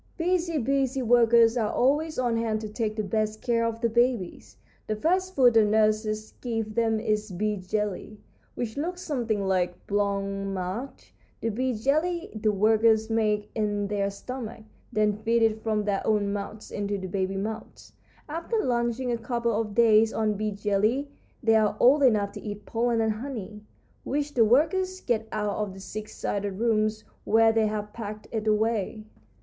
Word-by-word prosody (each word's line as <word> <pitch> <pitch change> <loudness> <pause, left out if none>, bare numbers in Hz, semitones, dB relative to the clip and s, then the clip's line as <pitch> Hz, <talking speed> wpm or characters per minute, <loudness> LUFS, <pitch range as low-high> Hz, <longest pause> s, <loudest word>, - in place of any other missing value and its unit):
"Busy, 340 -1 0
busy 270 0 0
workers 235 -1 +5
are 215 -3 0
always 300 +5 +1
on 245 -2 +1
hand 225 -1 0
to 215 - -4
take 215 0 -2
the 215 - -2
best 215 +1 -1
care 235 -2 +1
of 230 0 -2
the 235 - +3
babies. 235 -5 -1 0.3
The 215 - -1
first 370 - 0
food 250 -3 +6
the 225 -1 +6
nurses 215 0 +1
give 225 -3 -3
them 225 -1 +1
is 215 0 -1
bee 210 +3 -1
jelly, 210 +2 -3 0.4
which 230 -1 -4
looks 355 +5 -3
something 230 -9 -1
like 180 -2 -1
blanc 200 -1 0 0.2
mange. 195 +7 -5 0.3
This 225 -1 -2
bee 255 +2 -1
jelly 315 - 0
the 215 0 +1
workers 220 +2 +3
make 210 -2 0
in 205 -2 -1
their 200 -1 0
stomach, 230 +2 -7 0.3
then 210 -1 +1
feed 230 +1 +1
it 220 -1 +1
from 215 -2 0
their 200 -2 0
own 205 -2 +1
mouths 205 +1 -6
into 205 0 -2
the 190 - -6
baby 190 +1 -2
mouths. 215 +3 -6 0.3
After 335 +9 -3
lunching 245 - 0
a 235 - -1
couple 235 0 -1
of 210 -1 -2
days 225 -1 +5
on 215 -1 +1
bee 215 +1 -2
jelly 210 +7 0 0.3
they 225 -1 +4
are 210 -1 +2
old 280 +4 +5
enough 210 -6 +3
to - - -9
eat 205 -1 -7
pollen 230 0 0
and 220 0 +2
honey, 215 -3 -7 0.4
which 290 +1 -2
the 230 -3 +4
workers 370 - +2
get 225 -3 -1
out 210 -1 -2
of 205 -3 -3
the - - -10
six 215 +2 -7
sided 200 -1 -2
rooms 215 0 0 0.2
where 225 0 +4
they 220 -1 +2
have 210 0 -4
packed 215 -2 -7
it 220 -1 -3
away. 215 0 0
220 Hz, 175 wpm, -26 LUFS, 210-240 Hz, 0.4 s, food